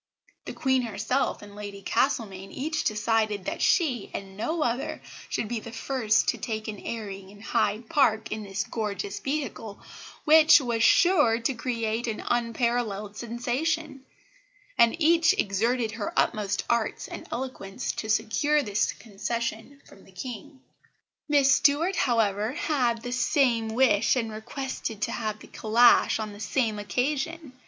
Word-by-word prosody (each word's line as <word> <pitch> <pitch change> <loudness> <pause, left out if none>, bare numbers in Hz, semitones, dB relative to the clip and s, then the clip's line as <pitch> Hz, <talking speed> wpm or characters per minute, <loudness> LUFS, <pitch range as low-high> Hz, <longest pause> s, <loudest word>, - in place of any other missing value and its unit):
The - - -6
Queen 260 -1 +1
herself 225 +3 -1
and 205 0 -12
Lady 205 -1 -8
Castlemaine 195 -7 -1
each 310 +3 -2
decided 215 -2 0
that - - -4
she 265 - +2
and 195 -1 -7
no 315 - -1
other 275 +6 -2 0.3
should 215 - -2
be 235 +1 -2
the 230 - -9
first 230 -1 +1
to - - -1
take 220 -3 -4
an 210 -2 -5
airing 200 -4 -6
in 205 +1 -15
Hyde 220 0 0
Park 220 -7 +2
in 215 - -3
this 195 -1 -3
georgeous 200 -2 -4
vehicle, 270 -7 -4 0.5
which 315 +1 +8
was 240 -4 -1
sure 295 -8 +5
to 250 +4 0
create 230 -1 -2
an 220 - -3
unparalleled 230 -3 -1
sensation; 270 +6 -2 0.7
and 235 +7 +4
each 330 0 +4
exerted 225 +4 0
her 220 -2 -5
utmost 200 -2 +1
arts 235 -2 -1
and - - -8
eloquence 245 -4 -4
to 220 - -6
secure 290 +8 +2
this 205 -3 0
concession 235 +5 -5
from 195 - -17
the - - -18
King. 255 +7 -8 0.7
"Miss 285 -1 +5
Stuart, 305 +6 +3
however, 220 - +1
had 245 -7 0
the 245 - -4
same 245 -2 +2
wish 230 -4 +4
and 230 -3 -1
requested 225 0 -5
to - - -1
have 215 -2 -3
the - - -14
calash 230 +3 +4
on 215 -2 -5
the 205 - -12
same 215 +1 -1
occasion. 280 +7 -2
230 Hz, 145 wpm, -27 LUFS, 215-265 Hz, 0.7 s, which